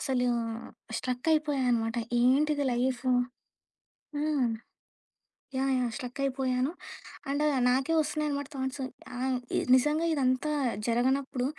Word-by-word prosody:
అసలు 255 -3 0 0.7
స్ట్రక్ 250 +3 -3
అయిపోయానమాట. 250 -7 +1 0.2
ఏంటిది 285 +4 +3
లైఫు? 255 +1 0 1.1
హ్మ్. 295 -4 +1 1.1
యాహ్! 270 0 +1
యాహ్! 250 -1 +1
స్ట్రక్ 250 +2 -6
అయిపోయాను. 260 +1 0 0.6
అండ్ 285 +2 +1 0.2
నాకే 265 +5 +2
వస్తున్నాయనమాట 295 -2 -2
థాట్స్. 265 +1 -3 0.4
ఆహ్, 260 0 0 0.2
ఇ - - +4 0.2
నిజంగా 300 +5 +2
ఇదంతా 265 +1 +1 0.4
జరగనప్పుడు 255 +2 +1
265 Hz, 100 wpm, -29 LUFS, 250-290 Hz, 1.1 s, ఇ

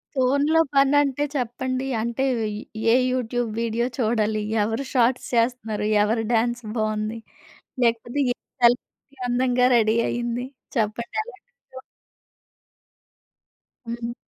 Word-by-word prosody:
ఫోనులో 280 +5 +3 0.2
పనంటే 280 0 +3
చెప్పండి? 255 +1 -2
అంటే 235 +3 -2 0.7
ఏ - - +6
యూట్యూబ్ 245 -2 -1
వీడియో 230 +1 0
చూడాలి? 220 -3 +1 0.2
ఎవరు 225 +5 -2
షాట్స్ 250 0 +2
చేస్తున్నారు, 230 -3 0 0.2
ఎవరు 225 +2 0
డాన్స్ 240 +1 +1
బావుంది 215 +1 -1 0.7
లేకపోతే 235 +3 0
ఏ - - -47 0.3
సెలబ్రిటీ 245 +3 +1
అందంగా 250 0 +2
రెడీ 220 -1 +3
అయింది 240 +1 -2 0.3
చెప్పండి 225 - -2
ఎలాంటి 485 0 -15
విషయం 260 0 -13 2.1
హ్మ్. 235 0 -4
240 Hz, 100 wpm, -24 LUFS, 225-260 Hz, 2.1 s, ఏ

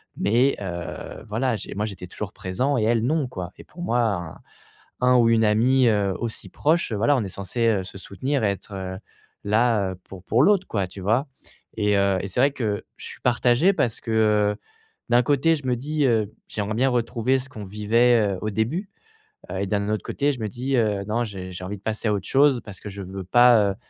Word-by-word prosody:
mais 120 +6 +2
heu, 85 +2 -6
voilà, 115 +3 0
j'ai 100 - -7
moi 105 +2 -1
j'étais 95 -4 -7
toujours 100 +2 -6
présent 125 +10 -1
et 110 - +1
elle, 115 0 +2
non, 150 +2 +1
quoi 90 -7 -6
et - - -11
pour 175 - -13
moi, 120 -8 0
un 90 -7 -3 0.6
un 125 0 +4
ou 120 -2 +5
une 115 -1 +4
amie, 120 +5 +3
heu, 100 -3 +2
aussi 115 -1 -5
proche, 160 0 +1
voilà, 115 +7 +2
on 120 - 0
est - - -4
censés, 105 +5 -2
heu, 100 -4 +2
se 95 - -10
soutenir 130 +9 -2
et - - +3
être 100 +1 -7 0.7
là, 110 -2 +2
heu, 95 - -8
pour 95 -2 -11
pour 115 +7 +3
l'autre, 190 +1 +4
quoi, 100 -4 -1
tu 95 +2 -10
vois? 110 +9 +1 0.5
Et 105 -1 +2
heu, 100 -1 +2
et - - -3
c'est 95 +6 -1
vrai 140 +2 +4
que 110 -7 -2
je - - -8
suis - - -9
partagé 125 +8 +3
parce 120 -10 -1
que, 115 - -5
heu, 105 -2 +3 0.5
d'un 120 +1 +4
côté, 145 +5 +3
je 140 - -8
me 125 - +2
dis, 150 +4 -1
heu, 110 -5 +2 0.2
j'aimerais 105 +1 -3
bien 130 +4 +2
retrouver 120 +1 +1
ce 130 +1 -7
qu'on 110 -4 -8
vivait, 105 +1 +2
heu, - - -6
au 110 - -1
début, 135 - -2 0.6
heu, 95 - -4
et - - 0
d'un 100 +1 -1
autre 110 0 -1
côté 145 0 0
je 125 - -9
me 110 - -1
dis, 130 +5 -2
heu, 105 -4 +1
non, 115 +3 0
j'ai 95 -4 -7
j'ai 90 0 -8
envie 100 +3 -5
de 95 - -20
passer 110 +1 -2
à - - +2
autre 100 -2 -3
chose 135 -3 +4
parce 100 -3 -9
que 105 - -8
je 100 0 -8
veux 95 0 -6
pas, 115 0 +5
heu, - - -6
110 Hz, 230 wpm, -24 LUFS, 100-125 Hz, 0.7 s, ou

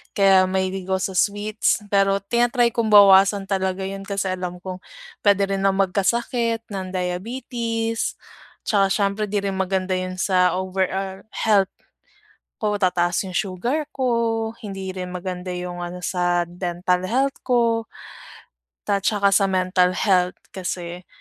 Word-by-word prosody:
kaya 195 -2 +5
mahilig 190 0 -2
ako 190 0 +1
sa - - -10
sweets. 210 +2 +1
Pero 195 -1 +3
tina-try 240 +2 +2
kong 230 -2 0
bawasan 200 0 +7
talaga 190 -1 -1
yun, 195 0 -5
kasi 195 -2 -1
alam 180 -1 -4
kong 185 -1 -6 0.4
pwede 200 -1 +4
rin 195 0 -1
ako 195 -1 +3
magkasakit 230 +4 0
ng 190 -2 -4
diabetes. 225 +5 -2 0.5
Tsaka 200 -2 +2
siyempre, 200 +1 0
‘di 205 0 -1
rin 195 -1 -2
maganda 190 0 -1
yun 185 0 -4
sa 180 -3 +3
overall 190 +1 -2
health 200 -4 +2 0.9
ko. 210 -1 -1
Tataas 175 0 +1
yung 180 - -5
sugar 225 - -1
ko, 230 -3 0
hindi 195 -2 -6
rin 180 -1 -5
maganda 180 0 -5
yung 180 0 -5
ano 175 +1 -7
sa 175 -1 0
dental 180 +1 -1
health 265 +5 0
ko. 230 -2 +2 1.1
At 200 -1 +1
saka 200 -2 +3
sa 195 0 +4
mental 185 -1 +2
health. 185 -2 +1
Kasi 175 -1 -5
195 Hz, 140 wpm, -22 LUFS, 185-210 Hz, 1.1 s, bawasan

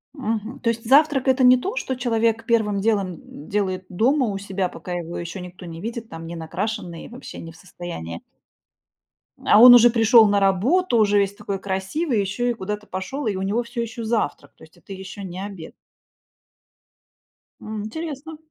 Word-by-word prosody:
Мгм, 225 -1 -3
то 230 - 0
есть 230 0 -2
завтрак- 280 +1 +4
это 260 0 +3
не 250 0 +7
то, 390 - -4
что 265 - -2
человек 230 -2 0
первым 220 -4 +1
делом, 200 -4 +1
м, 155 -2 -13
делает 190 -2 -1
дома 250 +8 +2
у 200 -2 -2
себя, 195 -2 -2
пока 180 - -9
его 175 -1 -5
еще 170 +2 -6
никто 180 +1 -10
не 165 -1 -8
видит, 230 +2 -5
там, 165 0 -8
ненакрашенный, 170 +2 -5
вообще 245 +2 -10
не 165 - -9
в - - -17
состоянии. 85 - -8 1.2
А 210 - +6
он 245 +2 +11
уже 240 0 +8
пришел 230 -1 +6
на 205 0 +2
работу, 235 - +2
уже 205 -2 +4
весь 200 0 0
такой 200 -1 -5
красивый, 200 - -2
еще 205 +5 -1
и - - -1
куда-то 210 -1 -5
пошел, 265 +10 -5
и 205 - 0
у 190 - -3
него 205 +5 0
всё 235 0 -5
еще 235 0 -5
завтрак, 215 -11 -2
то - - -18
есть 160 0 -18
это 195 - -11
еще 190 +1 -8
не 185 -1 -7
обед. 195 -5 -8 1.9
М. 215 -1 -6
Интересно. 315 +4 -6
210 Hz, 180 wpm, -22 LUFS, 185-240 Hz, 1.9 s, он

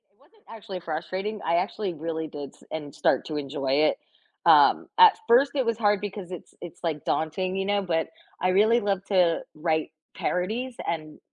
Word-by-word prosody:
It - - -40
wasn't 435 -2 -27
actually 210 -4 -7
frustrating. 180 +6 -4
I 165 - +2
actually 190 +1 -2
really 160 0 -4
did 145 -2 -7
s - - -22
en 150 -2 -5
start - - +1
to 155 - -5
enjoy 140 -2 -2 0.2
it. - - -8 0.5
Um, - - +6
at 450 -3 +8
first, 270 +4 +5
it 265 -3 +1
was 230 -1 0
hard 205 -3 +2
because 200 -3 -6
it's 180 - -9
it's, 175 -2 -9
like, 155 -3 -2
daunting, 185 +4 -1
you 195 0 -1
know, 205 0 +1
but, 165 -4 -1 0.4
I - - +4
really 215 +5 +4
love 200 -3 -1
to 180 -4 +3
write 155 0 -1 0.3
parodies 220 +8 -2
and, 155 -2 -4
185 Hz, 185 wpm, -26 LUFS, 160-210 Hz, 0.5 s, at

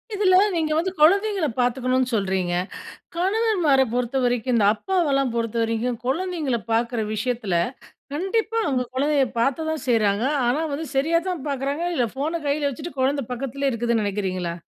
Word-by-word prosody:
இதில 380 -2 +4 0.2
நீங்க 315 -2 0
வந்து 370 +3 0
குழந்தைங்கள 390 +2 +4
பார்த்துக்கணுன் 255 +1 +1
சொல்றீங்க. 190 -4 0 0.6
கணவன்மார 370 -7 +2
பொறுத்தவரைக்கும், 245 -1 0
இந்த 210 -3 +3
அப்பாவெல்லாம் 280 - +1
பொறுத்தவரைக்கும் 230 +1 -1
குழந்தைங்கள 310 -3 -1
பார்க்குற 235 0 +1
விஷயத்தில 220 -4 -1 0.6
கண்டிப்பா 435 +7 -1
அவுங்க 260 -4 +1
குழந்தைய 285 0 +2 0.2
பார்த்த 275 +6 +1
தான் 315 -1 -3
செய்றாங்க. 215 -2 +2 0.2
ஆனா, 250 +6 +1
வந்து 320 +3 -3
சரியா 320 +5 +3
தான் 335 -7 -4
பார்க்குறாங்க. 280 +4 -2
இல்ல 245 - +2
ஃபோன 310 +5 -2
கையில 285 0 +1
வச்சுட்டு, 280 +3 -8
குழந்த 275 +1 +1
பக்கத்திலே 275 +2 -2
இருக்குதுன்னு 235 -1 0
நினைக்கிறீங்களா? 185 -4 -2
270 Hz, 135 wpm, -23 LUFS, 235-320 Hz, 0.6 s, இதில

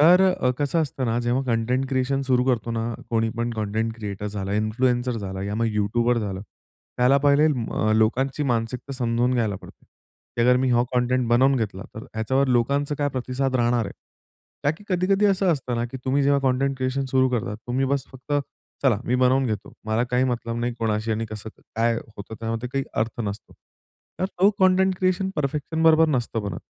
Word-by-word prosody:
तर 175 +5 +7
अ, 125 - 0
कसं 150 +3 +1
असतं 135 -3 -3
ना, 115 +1 +1
जेव्हा 120 +3 0
कंटेंट 125 +2 0
क्रिएशन 135 +1 0
सुरू 125 -2 +2
करतो 120 -3 0
ना, 115 0 -1 0.3
कोणी 115 -1 +1
पण 120 0 -1
कंटेंट 110 +1 -2
क्रिएटर 105 -2 -5
झाला, 100 -1 -4
इन्फ्लुएन्सर 120 +3 0
झाला, 95 -1 -5
या 100 +1 -3
मग 115 +1 +1
युट्युबर 115 +4 +1
झालं. 95 -3 -3 0.6
त्याला 125 +3 +5
पहिले 145 +1 +5
अ, 115 -6 0
लोकांची 130 +6 +1
मानसिकता 115 +4 -3
समजून 120 0 0
घ्यायला 110 -5 0
पडते. - - -15 0.5
की 120 - +2
अगर 125 +1 +5
मी 130 -1 +1
हा 120 0 +4
कंटेंट 125 0 +1
बनवून 130 +3 +4
घेतला 100 -5 -3
तर 110 - -7
ह्याच्यावर 130 +5 +1
लोकांचा 140 +4 +1
काय 145 - +1
प्रतिसाद 130 0 -2
राहणार 120 -1 +2
आहे? 100 - -6 0.7
ताकि 160 +8 -1
कधी-कधी 195 +2 +2
असं 190 -2 +3
असतं 130 -5 -3
ना 120 - 0
की - - -6
तुम्ही 135 +2 +2
जेव्हा 140 0 +3
कंटेंट 135 +1 +1
क्रिएशन 130 +1 -1
सुरू 130 0 +3
करता, 115 -4 -2
तुम्ही 125 +4 -2
बस 140 0 0
फक्त, 130 +3 -8 0.5
चला 125 -7 +3
मी 125 - 0
बनवून 130 +1 +3
घेतो. 105 -3 -4
मला 110 +2 +1
काही 125 +1 +1
मतलब 120 -2 -2
नाही 120 +1 -1
कोणाशी 110 0 -1
आणि 110 +1 -2
कसं, 110 0 -7 0.3
काय 115 +1 +2 0.2
होतं 100 +2 -8
त्यामध्ये 115 +2 -3
काही 135 0 0 0.2
अर्थ 115 +1 -5
नसतो. 100 0 -6 0.7
तर - - +2
तो 195 +1 +3
कंटेंट 190 0 +4
क्रिएशन 185 +1 +1
परफेक्शन 150 +2 -2
बरोबर 160 0 +6
नसतं 120 -5 -1
बनत. 100 -5 -4
125 Hz, 190 wpm, -24 LUFS, 115-135 Hz, 0.7 s, तर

